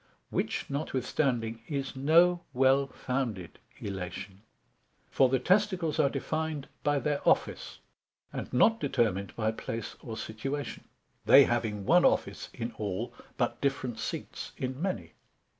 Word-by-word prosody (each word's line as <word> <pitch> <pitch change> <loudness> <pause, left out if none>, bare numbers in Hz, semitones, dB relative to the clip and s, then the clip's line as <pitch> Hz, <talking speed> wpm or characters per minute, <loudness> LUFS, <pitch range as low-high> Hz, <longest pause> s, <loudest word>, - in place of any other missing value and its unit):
Which - - -1
notwithstanding 130 -5 -1
is 140 -2 -3
no 170 +6 +5
well 135 +2 +4
founded 125 -9 -3 0.2
illation, 95 0 -6 0.7
for 130 - +4
the 130 - +3
testicles 185 - +2
are 140 - +5
defined 155 +1 -3
by 145 0 +2
their 145 +1 0
office, - - +1 0.6
and - - -5
not 225 - +4
determined 115 -9 0
by 110 -1 +1
place 115 0 -5
or 115 -3 -6
situation; 135 +7 -4 0.4
they 140 - +9
having 110 -5 -1
one 175 - +5
office - - +1
in 120 -1 -4
all, 105 +4 -3 0.2
but 120 - -1
different 130 -4 -1
seats - - -5
in 130 +2 -4
many. 100 - -2
130 Hz, 125 wpm, -30 LUFS, 110-145 Hz, 0.7 s, they